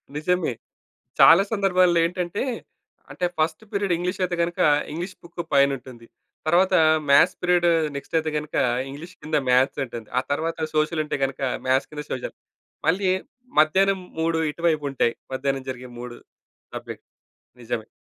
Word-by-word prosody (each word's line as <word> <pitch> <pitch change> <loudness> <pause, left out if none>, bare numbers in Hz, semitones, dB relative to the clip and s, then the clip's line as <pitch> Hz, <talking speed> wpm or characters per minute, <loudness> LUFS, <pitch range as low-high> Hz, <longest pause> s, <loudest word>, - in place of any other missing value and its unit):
నిజమే. 170 -2 0 0.7
చాలా 170 +4 +8
సందర్భాల్లో 185 -4 +3
ఏంటంటే, 180 +3 -2 0.7
అంటే 180 - -2
ఫస్ట్ 160 +5 0
పీరియడ్ 200 -3 0
ఇంగ్లీష్ 180 +2 -3
అయితే 180 -1 -1
గనక, 170 +1 -4 0.3
ఇంగ్లీష్ 175 +4 -5
బుక్కు 170 0 -7
పైనుంటుంది. 135 -4 +1 0.4
తర్వాత 185 +4 +3 0.4
మ్యాథ్స్ 160 +6 +6
పీరియడ్ 175 -1 +3 0.3
నెక్స్ట్ 140 +3 -2
అయితే 155 -1 -3
గనుక, 150 0 -6 0.3
ఇంగ్లీష్ 160 +7 -10
కింద 150 0 -1
మ్యాథ్స్ 130 +2 +3
ఉంటుంది. 115 -3 -8
ఆ - - 0
తరువాత 160 +1 -1
సోషల్ 155 +1 +1
ఉంటే 150 - -2
గనక, 135 0 -2 0.3
మ్యాథ్స్ 130 +1 +2
కింద 150 -1 -6
సోషల్. 130 - -4 0.5
మళ్ళీ 185 +3 +2 0.5
మధ్యాహ్నం 190 +5 +3 0.2
3 165 0 +1
ఇటువైపు 160 -2 0
ఉంటాయి. 120 -3 +1 0.2
మధ్యాహ్నం 135 0 -2
జరిగే 125 0 -9
3 120 0 -8 0.6
సబ్జెక్ట్. - - -8 0.6
నిజమే. 115 -1 -4
160 Hz, 135 wpm, -24 LUFS, 135-180 Hz, 0.7 s, చాలా